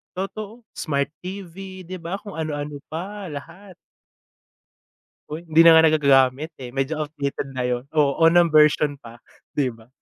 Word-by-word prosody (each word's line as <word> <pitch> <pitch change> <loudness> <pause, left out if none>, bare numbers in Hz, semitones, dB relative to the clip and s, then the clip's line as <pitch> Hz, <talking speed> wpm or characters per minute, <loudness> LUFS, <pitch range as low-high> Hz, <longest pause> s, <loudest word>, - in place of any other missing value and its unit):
Totoo, 210 +4 -6 0.2
Smart 140 -3 -1 0.2
TV 190 0 -8
di 185 - -5
ba, 175 +3 -5
kung 205 -5 -9
ano-ano 150 -2 -4
pa, 195 +5 -6
lahat. 175 +7 -10 1.6
Hoy, 160 +3 -7
hindi 160 +1 +6
na 165 - +9
nga - - +5
nagagagamit, 140 -1 +3
eh. 125 -2 -7
Medyo 135 +3 -1
outdated 140 -2 -4
na 130 - -1
yon. 125 0 -1
Oh, 145 -2 +2
unang 170 0 +4
version 150 -1 +4
pa, 115 -2 -12 0.4
'di 135 -3 +1
ba? 115 -1 -17
155 Hz, 150 wpm, -23 LUFS, 140-180 Hz, 1.6 s, na